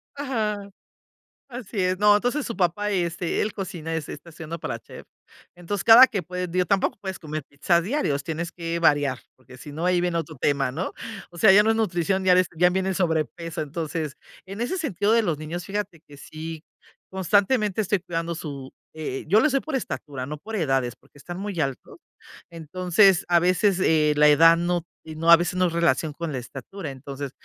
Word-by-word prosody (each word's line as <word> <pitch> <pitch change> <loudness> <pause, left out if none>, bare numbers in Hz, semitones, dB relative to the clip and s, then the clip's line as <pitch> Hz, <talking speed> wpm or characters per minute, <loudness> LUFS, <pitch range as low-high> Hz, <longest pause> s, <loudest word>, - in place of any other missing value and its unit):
Ajá. 215 -8 -3 0.8
Así 240 -5 -5
es. 185 +1 0
No, 210 0 +6
entonces 245 +7 0
su 230 - -5
papá, 195 +3 0
este, 175 -2 -1
él 215 - -1
cocina 175 -5 -5
este, 160 -2 -4
está 155 +3 -12
estudiando 165 0 -7
para 155 -8 -5
chef. - - -13 0.5
Entonces, 175 +3 -4
cada 235 +3 +9
que 200 -7 -3
puede, 180 0 -4
digo, 180 +1 0
tampoco 195 +3 +1
puedes 190 -2 -5
comer 155 -1 -5
pizzas 170 +5 0
diarios, 180 - -1
tienes 165 +1 -4
que 170 -1 -3
variar, 145 -5 +2 0.2
porque 130 0 -16
si 145 - -10
no, 165 +3 -3
ahí 180 -1 +3
viene 175 -1 0
otro 160 -1 -5
tema, 140 -2 +1
¿no? 165 +8 -4 0.4
O 175 - -15
sea, 205 +3 +6
ya 205 +2 +7
no 220 - +1
es - - 0
nutrición 190 -3 0
diaria, 185 0 +5
ya 180 +2 +5
viene 190 +1 -1
el 190 - -2
sobrepeso. 165 -1 -2
Entonces, 155 0 -4 0.3
en 195 +4 -7
ese 310 +11 -1
sentido 215 - 0
de 230 -1 +4
los 165 -6 -1
niños, 165 +3 -6
fíjate 200 -4 -4
que 145 - -14
sí, 155 +2 -8 0.5
constantemente 205 +3 +1
estoy 205 -1 0
cuidando 170 -1 -4
su, 140 -4 -7 0.2
eh, 155 -4 -5
yo 205 +7 +5
lo 305 - +3
se 275 - +1
por 310 +1 -5
estatura, 145 - -4
no 150 +3 -6
por 220 +8 -7
edades, 135 - 0
porque - - -24
está 175 +5 -8
muy 195 -2 -5
alto. 135 -4 -4 0.5
Entonces, 180 +3 +2
a 175 0 +4
veces 185 +2 +2
eh, 155 -3 +3
la 150 0 +5
edad 165 +3 +7
no 175 0 -1 0.2
no 160 +1 0
a 170 - +12
veces 175 +2 -2
no 185 0 +2
es 170 - -1
relación 165 -2 +1
con 165 +1 -5
la 135 - -3
estatura. 140 +7 -7
Entonces, 135 +1 -7
175 Hz, 200 wpm, -24 LUFS, 155-195 Hz, 0.8 s, a